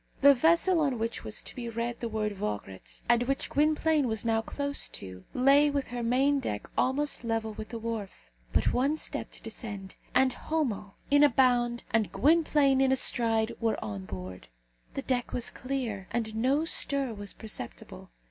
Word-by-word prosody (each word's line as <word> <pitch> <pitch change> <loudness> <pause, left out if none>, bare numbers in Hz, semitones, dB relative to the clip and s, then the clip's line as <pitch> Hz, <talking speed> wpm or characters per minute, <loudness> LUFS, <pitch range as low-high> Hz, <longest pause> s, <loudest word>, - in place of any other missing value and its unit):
The 280 +1 +9
vessel 335 +6 +4
on 280 -5 +1
which 225 +1 -3
was 215 - -4
to - - -5
be 235 -2 -5
read 230 +1 -3
the 235 - -3
word 215 -1 -1
Vograat, 105 - -6
and 240 0 +4
which 275 0 -1
Gwynplaine 305 -1 +2
was 220 -1 -1
now 225 -1 +2
close 285 +4 -3
to, 95 -1 -9
lay 275 +3 +5
with 280 -1 -2
her 245 0 -4
main 265 +4 +2
deck 105 - -4
almost 280 +1 +1
level 225 -1 -1
with 215 +1 -7
the 230 - -5
wharf. 215 - -6 0.2
But - - +2
one 275 +5 +2
step - - -3
to - - -10
descend, 205 -4 -7 0.2
and 260 0 +4
Homo 245 -11 -2 0.2
in 285 +1 +6
a 295 - +7
bound, 240 -2 +2
and 220 -3 +1
Gwynplaine 295 -3 +3
in 265 -1 +4
a - - +5
stride, 225 -3 +2
were 225 -1 +1
on 100 -3 -5
board. 90 -6 -8 0.5
The 275 - -3
deck 250 -2 -1
was 240 - -1
clear, 240 -7 -4
and 225 -2 -2
no 270 +7 +2
stir 275 -6 0
was 205 -1 -6
perceptible. 215 - -7
240 Hz, 180 wpm, -29 LUFS, 220-275 Hz, 0.5 s, The